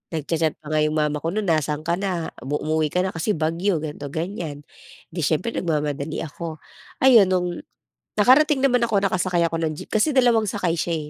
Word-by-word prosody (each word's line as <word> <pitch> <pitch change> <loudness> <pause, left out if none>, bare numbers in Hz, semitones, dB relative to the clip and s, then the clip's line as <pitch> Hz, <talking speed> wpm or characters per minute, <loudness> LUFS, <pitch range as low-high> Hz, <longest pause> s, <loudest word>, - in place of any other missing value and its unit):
Nag-cha-chat 160 0 -1
pa 155 -1 -8
nga 155 - +2
'yong 155 0 +1
mama 150 -1 0
ko - - -3
no'n, 215 +1 -1
"Nasaan 155 -3 0
ka 170 +2 0
na, 185 -4 -2
umu 145 +3 -3
umuwi 155 0 +1
ka 180 +4 0
na 190 - -2
kasi 170 +6 -1
bagyo." 165 +4 0
ganito, 145 -2 -6
ganyan. 160 -2 -5 0.5
'Di 170 - -6
siyempre 165 +10 0
nagmamadali 150 -3 -2
ako. 160 +1 -7 0.5
Ayun, 235 -7 +7
no'ng 180 -1 +1 0.7
nakarating 270 +5 +5
naman 250 -3 +3
ako, 215 -4 +1
nakasakay 185 -1 0
ako 165 - -3
ng 155 - 0
jeep - - -9
kasi 220 +8 +2
dalawang 240 -4 +4
sakay 185 -5 -1
siya 160 -3 -2
165 Hz, 190 wpm, -23 LUFS, 155-200 Hz, 0.7 s, Ayun